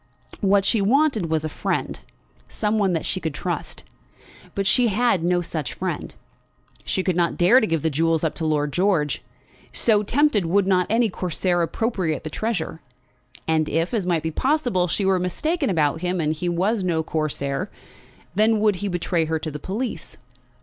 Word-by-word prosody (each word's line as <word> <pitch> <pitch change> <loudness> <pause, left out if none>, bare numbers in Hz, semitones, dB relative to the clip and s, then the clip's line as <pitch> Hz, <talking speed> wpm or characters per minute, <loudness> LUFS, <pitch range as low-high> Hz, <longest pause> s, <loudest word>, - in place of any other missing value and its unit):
What 200 -1 +3
she 220 +1 +2
wanted 235 - +2
was 160 -1 0
a - - 0
friend; 155 - -2 0.5
some 215 0 -1
one 195 -3 +2
that 165 - -1
she 185 - -1
could 160 -5 -4
trust. - - -4 0.7
But 195 - -1
she 245 +4 +4
had 215 -4 +2
no 175 0 +2
such 155 -5 -4
friend. - - -4 0.7
She 190 - -1
could 185 -2 0
not 170 -1 +1
dare 185 +9 +6
to 220 - 0
give 165 -5 -1
the 160 - +1
jewels 165 +2 +1
up 160 - 0
to 160 - -2
Lord 150 -2 0
George. 175 -6 +1 0.5
So 215 -3 +3
tempted, 225 - +2
would 195 +3 +3
not 185 -2 +2
any 225 0 +2
Corsair 180 0 -1
appropriate 180 - -1
the 155 - -6
treasure? 180 -5 -3 0.7
And 160 -1 +1
if, 165 +5 0
as 205 -6 -1
might 170 -3 +1
be 160 - -2
possible, 245 - +1
she 190 +4 -1
were 190 -1 +3
mistaken 300 - -1
about 160 -3 +1
him 180 0 -1
and 155 -1 +1
he 175 +3 -3
was 190 +5 0
no 165 -3 0
Corsair, 155 +2 -2 0.6
then 220 +1 +3
would 210 -2 +2
he 205 - -3
betray 175 -2 0
her 160 0 -1
to 155 0 -5
the 150 - -6
police? 220 - -5
180 Hz, 185 wpm, -23 LUFS, 160-210 Hz, 0.7 s, dare